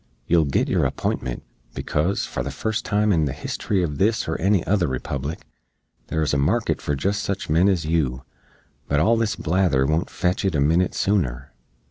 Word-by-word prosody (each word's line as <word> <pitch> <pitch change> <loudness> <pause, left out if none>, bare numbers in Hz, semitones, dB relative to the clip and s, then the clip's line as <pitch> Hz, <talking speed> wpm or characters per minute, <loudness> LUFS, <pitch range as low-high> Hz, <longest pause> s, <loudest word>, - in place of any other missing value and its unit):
"Yoo'll 85 -2 +3
git 70 - +1
your - - +1
apintment, - - -2 0.3
becoz, 85 +7 -1
for - - -4
the 70 - -3
fust 110 +10 -2
time 105 0 +2
in 80 -3 +2
the 70 - -2
history 95 -3 -2
uv 75 -3 -5
this 110 +3 +2
or 80 - -1
any 95 -1 +2
other 95 -3 +2
Republic, 70 +4 -4 0.6
there's 80 -2 0
a 70 - +2
market 70 - +1
for 75 - -1
jist 100 +9 -1
sich 100 -5 -3
men 85 +5 +4
ez 90 -5 0
yoo; 70 -5 0 0.6
but 70 - +1
all 110 +9 +4
this 115 -2 0
blather 85 -6 +1
won't 80 +4 0
fetch 90 0 -1
it 95 -5 0
a - - +2
minit 80 +6 +2
sooner." 70 -10 -1
80 Hz, 185 wpm, -23 LUFS, 70-100 Hz, 0.6 s, men